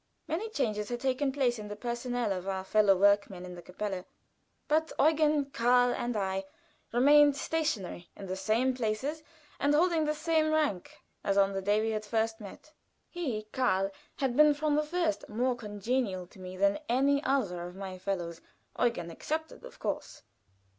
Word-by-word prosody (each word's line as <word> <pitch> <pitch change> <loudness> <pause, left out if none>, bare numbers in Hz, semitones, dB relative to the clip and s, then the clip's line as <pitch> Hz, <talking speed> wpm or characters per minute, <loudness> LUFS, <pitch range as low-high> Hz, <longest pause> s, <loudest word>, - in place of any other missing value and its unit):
Many 340 +8 -2
changes 215 - -1
had 240 0 -3
taken 270 +1 0
place 255 -4 +1
in 210 - -7
the 205 - -6
personnel 240 0 -2
of 185 0 -5
our 190 -1 -2
fellow 200 0 +4
workmen 200 -2 +3
in 180 - -8
the 175 - -9
kapelle, 185 +1 -4 0.6
but 315 +1 +1
Eugen, 300 -2 +3
Karl, 245 +1 +3
and 240 -2 -2
I 190 -1 -1 0.5
remained 290 +4 +6
stationary 275 - -2
in 200 - -8
the 185 0 -3
same 220 +7 +1
places 255 +6 -2 0.4
and 290 +1 +3
holding 330 -1 +3
the 300 0 0
same 315 0 +1
rank 300 - -1 0.2
as 200 -1 +1
on 195 0 +4
the 195 - -2
day 205 +2 +2
we 225 0 0
had 215 -1 -2
first 220 +1 0
met. 210 +9 -11 0.4
He, 265 -12 -3
Karl, 195 -7 +1 0.2
had 265 -3 -1
been 300 +1 +6
from 300 0 0
the 300 - +3
first 320 +1 -1
more 245 +4 0
congenial 210 -3 -2
to 180 - -18
me 185 0 -8
than 200 +4 +2
any 280 +4 +3
other 215 -10 0
of 180 - -11
my 190 -1 -7
fellows 175 -4 -3 0.4
(Eugen 205 -9 0
excepted, 315 - -4
of - - -11
course). - - -4
240 Hz, 175 wpm, -30 LUFS, 195-290 Hz, 0.6 s, remained